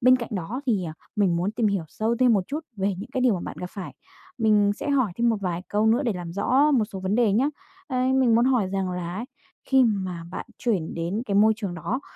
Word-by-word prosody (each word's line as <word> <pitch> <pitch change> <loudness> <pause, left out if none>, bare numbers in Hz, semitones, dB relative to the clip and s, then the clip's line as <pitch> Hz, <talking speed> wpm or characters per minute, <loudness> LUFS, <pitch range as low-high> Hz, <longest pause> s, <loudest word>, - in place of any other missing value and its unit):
Bên 255 +1 +6
cạnh 240 -2 -5
đó 205 +8 -3
thì, 205 -7 +1
ờ, 160 - -5 0.2
mình 195 -5 +2
muốn 180 +4 0
tìm 225 0 +1
hiểu 200 -5 0
sâu 225 +7 -1
thêm 250 -1 +4
một 195 -4 +2
chút 300 +3 -3 0.2
về 195 0 0
những 230 +6 -8
cái 260 -2 -2
điều 245 -5 +4
mà 175 - -3
bạn - - -6
gặp 180 - -5
phải, 185 -9 -7 0.4
mình 210 -3 +4
sẽ 290 - -3
hỏi 255 -9 +2
thêm 235 0 +2
một 225 - +2
vài 180 -2 -2
câu 210 +1 +1
nữa 230 +5 +3
để 235 -6 0
làm 175 -2 -6
rõ 270 +9 +3
một 240 -6 +3
số 195 -2 -8
vấn 190 +2 -1
đề 225 -3 +3
nhá. 260 +7 +3 0.4
Ấy, 255 -2 0
mình 255 -4 +4
muốn 235 - +4
hỏi 250 -6 +2
rằng 190 -1 -2
là 175 -1 -4
ấy, 220 +5 -4 0.4
khi 265 -1 +4
mà 185 -6 -1
bạn 185 - -6
chuyển 200 -10 -1
đến 170 +7 -2
cái 200 - -1
môi 215 +2 +6
trường 200 -6 -4
đó 210 - -3
210 Hz, 260 wpm, -25 LUFS, 185-245 Hz, 0.4 s, Bên